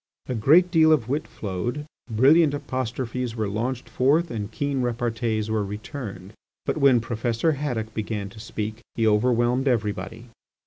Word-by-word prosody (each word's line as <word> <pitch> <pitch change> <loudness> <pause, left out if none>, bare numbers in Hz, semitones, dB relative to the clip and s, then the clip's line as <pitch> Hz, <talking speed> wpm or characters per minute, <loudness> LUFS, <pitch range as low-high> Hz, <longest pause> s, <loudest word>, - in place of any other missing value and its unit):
A - - -3
great 155 +11 +5
deal 160 -3 +5
of 135 -8 +3
wit 145 +3 -1
flowed; 120 +9 -4 0.2
brilliant 145 +7 +5
apostrophes 125 -2 -3
were 110 -2 -1
launched 120 +5 -3
forth 150 +7 +2
and 110 -2 -4
keen 140 +2 -1
repartees 115 -2 -1
were 110 -1 +1
returned. 105 -1 -7 0.3
But - - -1
when 135 -4 +5
Professor 115 +5 0
Haddock 125 -7 -3
began 105 -2 -3
to 110 - -13
speak 110 0 -5 0.2
he 115 - +1
overwhelmed 120 +4 +2
everybody. 115 -1 -2
120 Hz, 145 wpm, -24 LUFS, 110-135 Hz, 0.3 s, great